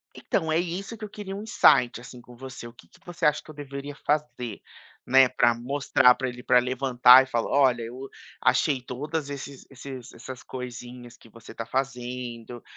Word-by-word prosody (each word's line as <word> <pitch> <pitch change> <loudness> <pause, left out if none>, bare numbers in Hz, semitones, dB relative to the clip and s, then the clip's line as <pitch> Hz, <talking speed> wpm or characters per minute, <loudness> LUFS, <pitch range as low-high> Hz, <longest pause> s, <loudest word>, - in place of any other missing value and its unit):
Então 160 -4 -2
é 160 - +2
isso 185 +6 -4
que 215 - -7
eu 210 - -10
queria 195 -2 -7
um 205 - -6
insight 120 - +4
assim 125 0 -12
com 120 0 -16
você. 130 -2 -9
O 120 - -13
que 85 - -19
que - - -23
você 175 -1 -4
acha 150 0 +3
que - - -19
eu - - -15
deveria 140 0 -7
fazer, 145 -7 -2 0.4
né. 130 +1 +6
Para 120 -1 +3
mostrar 130 +1 +3
pra 130 - -3
ele, 125 0 -10
para 125 - +5
levantar 125 0 +5
e - - -8
falar: 120 -3 -2
"Olha, 130 -4 +3
eu 125 +4 -8 0.3
achei 135 -4 +2
todas 145 +4 -5
esses 140 -1 -8
esses 130 -2 -9
essas 125 +1 -10
coisinhas 125 -1 -9
que 115 - -19
você 115 0 -14
está 115 - -6
fazendo, 125 -2 -5
130 Hz, 195 wpm, -26 LUFS, 120-145 Hz, 0.4 s, né